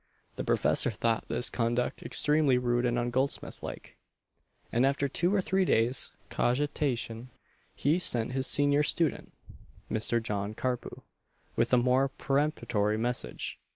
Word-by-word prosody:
The - - -4
professor - - +2
thought 115 0 -1
this 115 +2 0
conduct 120 +1 -1
extremely 150 -3 +2
rude 120 0 +1
and 120 0 0
ungoldsmithlike; 125 +3 -3 0.7
and 120 - +2
after 140 +1 +1
two 175 +6 +1
or 200 -1 +2
three 190 +1 +1
days' 120 -6 +2 0.2
cogitation 125 -3 -1 0.5
he 155 +6 +1
sent 120 -9 0
his 130 0 +1
senior 145 0 +3
student, 155 +1 0 0.6
Mr. 110 +2 +1
John 105 -2 -3
Carpue, 125 0 -4 0.5
with - - +1
a 125 - +5
more 130 +2 +3
peremptory 135 -7 0
message. 115 - -3
125 Hz, 125 wpm, -29 LUFS, 115-140 Hz, 0.7 s, a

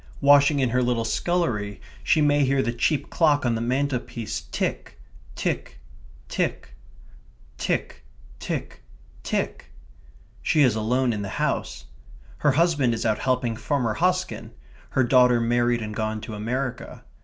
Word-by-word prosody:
Washing 145 +1 +5
in 130 -3 +1
her 125 +1 +2
little 120 -2 0
scullery, 115 - -1 0.2
she 155 - +3
may 145 -1 +3
hear 135 0 +2
the 120 - -1
cheap 140 +5 0
clock 150 -4 +3
on 120 - +2
the 115 - -2
mantelpiece 125 -2 -2
tick, - - -3 0.4
tick, - - -3 0.5
tick... - - -2 0.9
tick, - - -2 0.4
tick, - - -5 0.4
tick. - - -3 0.7
She 155 - +3
is 125 -5 +4
alone 120 +3 +1
in 105 - -3
the 100 - -4
house. - - -2 0.5
Her 145 -2 +3
husband 145 -6 +2
is 115 - -4
out 110 -1 +1
helping 125 -3 0
Farmer 125 -2 -1
Hosken; 180 +7 -1 0.4
her 130 - +2
daughter 125 -1 +5
married 120 0 +1
and 105 0 -5
gone 110 0 -2
to 110 - -7
America. 125 +4 -4
125 Hz, 140 wpm, -24 LUFS, 115-145 Hz, 0.9 s, Washing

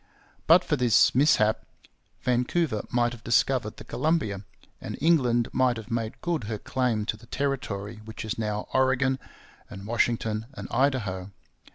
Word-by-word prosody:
But 175 +3 +7
for 150 - 0
this 125 -3 +4
mishap 125 -6 +3 0.6
Vancouver 125 0 0
might 120 -1 +1
have 120 -2 -10
discovered 115 -2 +1
the - - -9
Columbia, 125 - -1 0.4
and - - -6
England 125 -7 +3
might 130 -2 +2
have 115 +2 -9
made 115 -1 -3
good 165 -9 -1
her 110 0 -3
claim 115 -2 -1
to 105 - -1
the 115 +2 -17
territory 110 -7 -3
which 110 0 -8
is 110 - -2
now 105 -1 -3
Oregon 130 0 +2 0.5
and 95 0 -9
Washington 115 -1 0
and - - -7
Idaho. 105 -9 0
120 Hz, 150 wpm, -26 LUFS, 110-130 Hz, 0.6 s, But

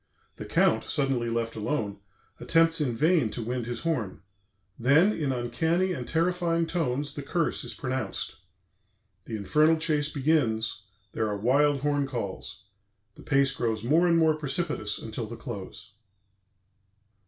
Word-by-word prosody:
The - - -7
Count, - - +2
suddenly 135 -4 0
left 115 0 -2
alone, 105 -3 -2 0.4
attempts 165 -1 +3
in 125 -5 0
vain 155 -2 +3
to 115 +2 -5
wind 120 0 -3
his 120 - -4
horn; 125 - -2 0.6
then, 150 - +5
in 145 -7 -1
uncanny 160 +10 0
and 125 -7 -5
terrifying 170 0 +1
tones, 145 -4 -2
the 145 - -5
curse 165 +3 -1
is - - -6
pronounced. 130 -3 -3 0.9
The 115 - -5
Infernal 150 +11 +3
Chase 155 -2 +1
begins, 115 -9 0 0.3
there 110 0 -1
are 105 -1 -2
wild 140 +6 +3
horn 145 -1 +1
calls; 115 -8 -5 0.5
the - - -15
pace 135 0 +2
grows 115 -5 -2
more 160 +8 +3
and 170 -1 +4
more 160 -1 +4
precipitous 150 -7 -2
until 110 0 -5
the 115 +1 -8
close. 105 -3 -8
135 Hz, 140 wpm, -27 LUFS, 115-160 Hz, 0.9 s, then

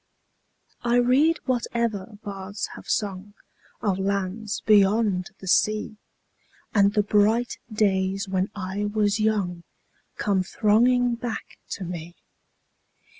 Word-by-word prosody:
I 240 0 +1
read 260 +7 +4
whatever 235 -5 -2
bards 200 0 -5
have - - -12
sung 200 -1 -2 0.5
Of 195 -3 0
lands 200 +2 -2
beyond 205 -3 +3
the 190 - -11
sea, 215 +3 +1 0.8
10 200 -2 +5
And 200 - +2
the 210 - +4
bright 215 +4 +2
days 195 -1 +1
when 190 0 0
I 200 +1 -3
was 205 0 +1
young 200 -5 0 0.6
Come 200 -3 +1
thronging 240 +5 +3
back 235 -1 -6
to 195 - -5
me. 175 -1 -6
205 Hz, 115 wpm, -25 LUFS, 190-225 Hz, 0.8 s, 10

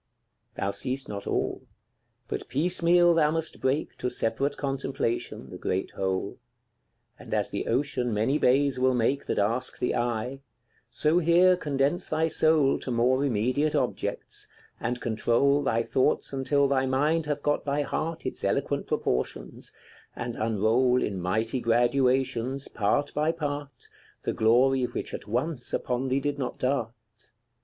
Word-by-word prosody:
Thou 100 - -1
seest 130 +6 -3
not 100 -1 -6
all; - - -1 0.7
but - - -4
piecemeal 175 +2 +3
thou 155 -2 +3
must 160 0 -2
break 130 +3 0
To 125 - -1
separate 125 +4 -1
contemplation, 135 -3 -3
the - - -8
great 95 +1 -2
whole; 95 -1 -2 0.8
And - - -4
as - - 0
the - - -3
ocean 125 -1 0
many 115 +8 +1
bays 135 +1 +3
will 130 0 +3
make, 130 +4 0
That - - -1
ask 115 +5 0
the - - 0
eye 120 +2 -2 0.5
so 155 +3 +2
here 180 +2 +5
condense 145 +1 -1
thy 160 +1 +1
soul 155 -3 +3
To - - -6
more 125 +3 +2
immediate 130 +4 +1
objects, - - -2 0.3
and 120 +1 -2
control 120 +5 +2
Thy 115 -4 +1
thoughts 130 +3 0
until 140 +1 +2
thy 135 -1 +1
mind 150 +4 +1
hath 145 -1 -2
got 145 0 +1
by 145 +1 0
heart 165 +3 -3
Its - - -4
eloquent - - 0
proportions, 60 0 -2 0.4
and 120 -1 -4
unroll 115 +4 +2
In 95 -3 -3
mighty 110 +7 -1
graduations, 125 +2 +1
part 145 +7 0
by 150 +2 +1
part, 145 -3 -5 0.4
The - - -1
glory 125 +4 +3
which - - -5
at - - -6
once 125 +4 -2
upon 125 +1 -2
thee 130 +1 +1
did 145 0 -2
not 130 - -3
dart. 130 -3 0
130 Hz, 150 wpm, -27 LUFS, 120-145 Hz, 0.8 s, here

